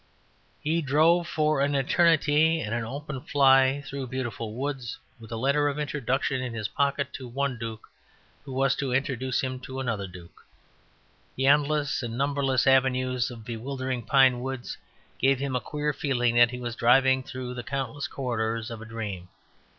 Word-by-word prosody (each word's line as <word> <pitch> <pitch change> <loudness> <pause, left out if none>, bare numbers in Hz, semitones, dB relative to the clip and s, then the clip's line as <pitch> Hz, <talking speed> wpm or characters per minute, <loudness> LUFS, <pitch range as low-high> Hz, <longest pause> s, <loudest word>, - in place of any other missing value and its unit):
He 165 +3 0
drove 160 +4 +3
for 155 -3 +1
an 140 +1 +1
eternity 160 +2 +3
in 110 -4 -3
an 120 0 -1
open 135 +3 -6
fly 135 0 +4
through 135 -1 -5
beautiful 120 -4 -4
woods, 135 -2 -4 0.2
with 115 -1 -13
a - - -3
letter 140 +5 +2
of 145 - -4
introduction 140 -2 -1
in 125 -2 -4
his 105 -2 -2
pocket 140 +1 0
to 130 - -7
one 135 0 -2
duke, 110 -1 -6 0.6
who 135 - -9
was 135 +1 +2
to 135 -2 -2
introduce 130 -1 0
him 130 -1 -3
to 130 +1 -7
another 115 -7 -2
duke. 90 -2 -14 0.9
The 135 - 0
endless 145 0 +2
and 120 -1 -5
numberless 135 -2 +1
avenues 130 -1 +2
of 115 -3 -10
bewildering 130 +2 -4
pine 130 +1 +4
woods 130 -1 -5 0.4
gave 135 +1 +3
him 135 0 -2
a 125 - 0
queer 150 0 -2
feeling 125 -4 0
that 120 0 +6
he 125 - -6
was 120 -1 -5
driving 130 +2 +4
through 130 -1 -6
the 125 - -5
countless 140 +2 -3
corridors 115 -5 -2
of 115 -1 -7
a - - -8
dream. 105 -6 -6
130 Hz, 170 wpm, -27 LUFS, 120-140 Hz, 0.9 s, that